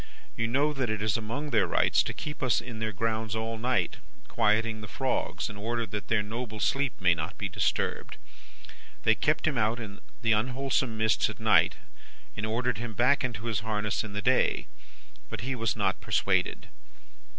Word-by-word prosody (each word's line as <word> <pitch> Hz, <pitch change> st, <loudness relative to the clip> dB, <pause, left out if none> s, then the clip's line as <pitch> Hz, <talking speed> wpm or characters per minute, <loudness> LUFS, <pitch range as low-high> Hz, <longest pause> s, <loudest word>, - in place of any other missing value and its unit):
You 115 Hz, -, 0 dB
know 140 Hz, +6 st, +2 dB
that 130 Hz, -5 st, -1 dB
it 110 Hz, 0 st, -1 dB
is 110 Hz, -3 st, +1 dB
among 120 Hz, +7 st, -3 dB
their 110 Hz, -5 st, +3 dB
Rights -, -, +3 dB
to -, -, -2 dB
keep 150 Hz, -1 st, -6 dB
us 130 Hz, -4 st, +3 dB
in 115 Hz, -3 st, -7 dB
their 110 Hz, 0 st, -1 dB
grounds 110 Hz, +1 st, -1 dB
all 110 Hz, 0 st, -3 dB
night, 120 Hz, -7 st, 0 dB, 0.3 s
quieting 110 Hz, +1 st, +1 dB
the 105 Hz, -, -7 dB
frogs, 130 Hz, +5 st, -1 dB
in 105 Hz, -, -7 dB
order 115 Hz, +3 st, -1 dB
that 105 Hz, 0 st, -5 dB
their 110 Hz, -2 st, +2 dB
noble 110 Hz, +1 st, -5 dB
sleep 135 Hz, +4 st, +1 dB
may 90 Hz, -2 st, +5 dB
not 80 Hz, -2 st, -4 dB
be -, -, -2 dB
disturbed. -, -, -1 dB, 0.9 s
They 115 Hz, -, +5 dB
kept 150 Hz, +7 st, +1 dB
him 140 Hz, -5 st, +1 dB
out 110 Hz, +2 st, +1 dB
in 105 Hz, -3 st, -7 dB, 0.2 s
the 115 Hz, -, +3 dB
unwholesome 125 Hz, +1 st, +1 dB
mists 110 Hz, 0 st, +3 dB
at -, -, -8 dB
night, -, -, +4 dB, 0.6 s
and 105 Hz, -, -2 dB
ordered 120 Hz, 0 st, 0 dB
him 115 Hz, -1 st, -4 dB
back 130 Hz, +6 st, +3 dB
into 120 Hz, -3 st, -3 dB
his 110 Hz, -4 st, 0 dB
harness 105 Hz, -1 st, -1 dB
in 105 Hz, -2 st, -7 dB
the 105 Hz, 0 st, -3 dB
day. -, -, +3 dB, 0.6 s
But -, -, -5 dB
he 130 Hz, +3 st, -2 dB
was 115 Hz, -3 st, 0 dB
not 100 Hz, -3 st, 0 dB
persuaded. -, -, 0 dB
110 Hz, 185 wpm, -29 LUFS, 105-125 Hz, 0.9 s, may